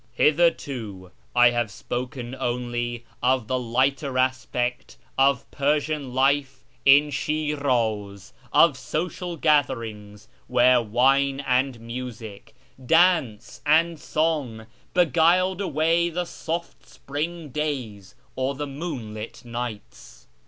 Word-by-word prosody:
Hitherto 125 Hz, -, 0 dB, 0.2 s
I 120 Hz, 0 st, +6 dB
have 120 Hz, -2 st, -1 dB
spoken 125 Hz, +3 st, -5 dB
only 120 Hz, -1 st, -3 dB, 0.2 s
of 130 Hz, -1 st, +2 dB
the 130 Hz, +2 st, 0 dB
lighter 130 Hz, +3 st, 0 dB
aspect 125 Hz, -1 st, -1 dB, 0.2 s
of 135 Hz, -1 st, +3 dB
Per 145 Hz, +1 st, +2 dB
sian 145 Hz, -2 st, -4 dB
life 135 Hz, 0 st, +1 dB, 0.2 s
in 145 Hz, +2 st, +6 dB
Shiraz; 130 Hz, -10 st, -1 dB, 0.2 s
of -, -, +5 dB
social 175 Hz, +1 st, -4 dB
gatherings 115 Hz, -9 st, 0 dB, 0.2 s
where 125 Hz, 0 st, +4 dB
wine 135 Hz, +5 st, +2 dB
and 130 Hz, -2 st, 0 dB
music, 115 Hz, -2 st, -8 dB, 0.3 s
dance 160 Hz, -, +2 dB
and 160 Hz, +2 st, +3 dB
song, 145 Hz, -8 st, -1 dB, 0.3 s
beguiled 180 Hz, +3 st, +3 dB
away 165 Hz, 0 st, +1 dB
the 175 Hz, +1 st, -3 dB
soft 170 Hz, 0 st, -6 dB
spring 155 Hz, +3 st, -5 dB
days, 130 Hz, -10 st, -4 dB, 0.2 s
or 130 Hz, +1 st, -1 dB
the 145 Hz, +2 st, -4 dB
moonlit 125 Hz, -8 st, -7 dB
nights. 120 Hz, -, -7 dB
130 Hz, 105 wpm, -24 LUFS, 120-150 Hz, 0.3 s, I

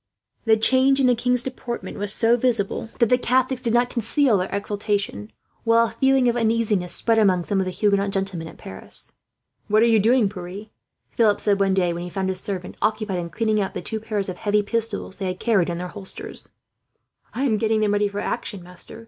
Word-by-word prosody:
The 220 Hz, -1 st, +4 dB
change 260 Hz, +4 st, +4 dB
in 270 Hz, -, +3 dB
the 250 Hz, -, +5 dB
king's 250 Hz, +1 st, +2 dB
deportment 245 Hz, -4 st, -6 dB
was 205 Hz, 0 st, -1 dB
so 230 Hz, +2 st, +4 dB
visible 225 Hz, -3 st, 0 dB
that 235 Hz, -3 st, +3 dB
the 250 Hz, -, +4 dB
Catholics 255 Hz, +1 st, +1 dB
did 235 Hz, -1 st, +1 dB
not 245 Hz, +1 st, +2 dB
conceal 235 Hz, -1 st, +2 dB
their 185 Hz, -, -2 dB
exultation, 200 Hz, -, -2 dB, 0.3 s
while 230 Hz, 0 st, +4 dB
a -, -, -3 dB
feeling 265 Hz, -1 st, +2 dB
of 240 Hz, -, +2 dB
uneasiness 220 Hz, -6 st, 0 dB
spread 225 Hz, -1 st, +2 dB
among 185 Hz, -4 st, +3 dB
some 195 Hz, +3 st, -1 dB
of 190 Hz, -, 0 dB
the 185 Hz, -, -3 dB
Huguenot 200 Hz, 0 st, +1 dB
gentlemen 195 Hz, -4 st, -2 dB
at -, -, -12 dB
Paris. 95 Hz, -, -6 dB, 0.5 s
"What 215 Hz, +2 st, +4 dB
are -, -, +5 dB
you 225 Hz, -2 st, +4 dB
doing, 230 Hz, +1 st, +3 dB
Pierre!" 195 Hz, +2 st, -8 dB, 0.4 s
Philip 220 Hz, -4 st, +2 dB
said 200 Hz, -1 st, +1 dB
one 195 Hz, -1 st, +2 dB
day, 180 Hz, -2 st, +1 dB
when 170 Hz, -, -5 dB
he 175 Hz, -, -6 dB
found 190 Hz, +1 st, -2 dB
his 185 Hz, 0 st, -2 dB
servant 185 Hz, -3 st, -5 dB
occupied 215 Hz, -4 st, -1 dB
in 170 Hz, -1 st, -5 dB
cleaning 215 Hz, +1 st, 0 dB
up 190 Hz, -, -4 dB
the -, -, -3 dB
two 220 Hz, -, -3 dB
pairs 210 Hz, -2 st, -3 dB
of 185 Hz, -2 st, -5 dB
heavy 210 Hz, 0 st, +1 dB
pistols 220 Hz, -2 st, -3 dB
they 190 Hz, -2 st, -1 dB
carried 190 Hz, -3 st, +1 dB
in 170 Hz, -, -3 dB
their 180 Hz, +1 st, -5 dB
holsters. 195 Hz, -1 st, -6 dB, 0.9 s
"I 260 Hz, -, -1 dB
am 230 Hz, -6 st, +2 dB
getting 220 Hz, 0 st, +1 dB
them 210 Hz, -1 st, +2 dB
ready 205 Hz, 0 st, +2 dB
for 200 Hz, 0 st, -5 dB
action, 195 Hz, -4 st, -4 dB
master. 180 Hz, +5 st, -11 dB
210 Hz, 215 wpm, -23 LUFS, 190-230 Hz, 0.9 s, the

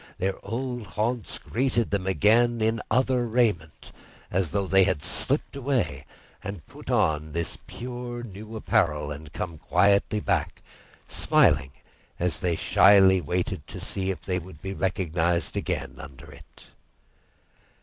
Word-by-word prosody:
Their 95 Hz, +1 st, -2 dB
old 120 Hz, +1 st, -4 dB
haunts 115 Hz, 0 st, -1 dB
greeted 120 Hz, -2 st, -1 dB
them 100 Hz, -2 st, -1 dB
again 115 Hz, +5 st, +3 dB
in 110 Hz, 0 st, +1 dB
other 130 Hz, -1 st, +2 dB
raiment, 110 Hz, -10 st, 0 dB, 0.4 s
as 90 Hz, -2 st, 0 dB
if 100 Hz, -3 st, -1 dB
they 95 Hz, 0 st, +6 dB
had 90 Hz, -6 st, 0 dB
slipped 130 Hz, -, +1 dB
away 135 Hz, -6 st, -1 dB, 0.4 s
and 100 Hz, -7 st, -6 dB
put -, -, -12 dB
on 75 Hz, -1 st, +1 dB
this 85 Hz, 0 st, -3 dB
pure 120 Hz, -1 st, -6 dB
new 110 Hz, 0 st, -9 dB
apparel 75 Hz, -8 st, +1 dB
and 75 Hz, +1 st, -8 dB
come 85 Hz, -3 st, -5 dB
quietly 100 Hz, +5 st, +2 dB
back, -, -, -1 dB, 0.4 s
smiling 65 Hz, -2 st, +3 dB, 0.5 s
as 85 Hz, -2 st, +1 dB
they 85 Hz, -2 st, 0 dB
shyly 95 Hz, +1 st, +6 dB
waited 90 Hz, -3 st, -2 dB
to -, -, -8 dB
see 95 Hz, -1 st, -3 dB
if 95 Hz, -, -4 dB
they 90 Hz, -1 st, -1 dB
would 90 Hz, -3 st, -12 dB
be 95 Hz, +2 st, -5 dB
recognised 85 Hz, -4 st, 0 dB
again -, -, -3 dB
under 70 Hz, -1 st, -11 dB
it. -, -, -16 dB
95 Hz, 140 wpm, -26 LUFS, 85-115 Hz, 0.5 s, they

